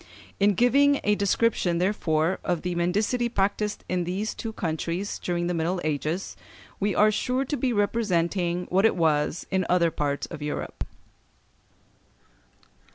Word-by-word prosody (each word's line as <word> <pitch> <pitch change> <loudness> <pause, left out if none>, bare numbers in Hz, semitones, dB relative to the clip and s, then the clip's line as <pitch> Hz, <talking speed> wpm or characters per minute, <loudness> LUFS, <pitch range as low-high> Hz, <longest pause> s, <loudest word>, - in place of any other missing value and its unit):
In 200 0 +4
giving 280 +5 +4
a 210 - +3
description, 200 -3 +1
therefore, 170 -2 +1
of 175 -2 -1
the 180 -1 -2
mendicity 210 +8 0
practised 205 0 -1
in 180 -1 0
these 190 +5 -2
two 225 - -5
countries 170 +1 -3
during 175 -1 -2
the 175 - -1
Middle 170 +2 -1
Ages, 155 +4 -2 0.4
we 205 -1 0
are 215 +1 +5
sure 255 +5 -1
to 290 - -2
be 260 -1 0
representing 180 -5 0
what 190 +2 +3
it 225 - +4
was 155 -1 +1
in 190 -1 +1
other 170 -2 +3
parts 145 -2 -2
of - - -7
Europe. 150 0 -4
185 Hz, 145 wpm, -26 LUFS, 170-210 Hz, 0.4 s, are